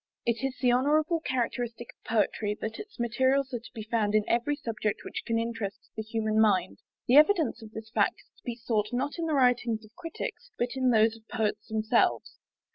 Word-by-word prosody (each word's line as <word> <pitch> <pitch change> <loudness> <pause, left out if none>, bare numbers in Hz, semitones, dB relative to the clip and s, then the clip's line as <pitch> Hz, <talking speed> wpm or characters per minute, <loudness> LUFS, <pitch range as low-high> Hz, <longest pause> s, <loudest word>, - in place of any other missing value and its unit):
It 235 +2 0
is 270 -1 -2
the 250 -2 +3
honourable 300 +6 +2
characteristic 240 -4 -2
of - - -55
Poetry 210 -1 +1
that 220 +1 -4
its 420 - -10
materials 260 +3 +1
are 240 - -1
to 230 - -14
be 220 -3 -7
found 215 -2 0
in 215 -1 +2
every 240 +5 +1
subject 225 -6 -3
which - - -4
can 230 -1 +1
interest 225 -3 -4
the 220 - -3
human 220 0 -1
mind. 190 -4 +2 0.3
The 255 - +6
evidence 305 - +4
of 220 - -10
this 220 0 -8
fact - - +1
is - - -39
to - - -31
be 240 -2 -4
sought, 225 -3 -1
not 280 +6 -2
in 330 - -1
the 310 - +1
writings 245 -4 +2
of 215 - -20
Critics, 350 +7 -6
but 240 - 0
in 260 -1 +2
those 220 -1 +4
of 220 -1 -18
Poets 215 -2 -2
themselves. 220 0 +1
235 Hz, 205 wpm, -28 LUFS, 220-260 Hz, 0.3 s, The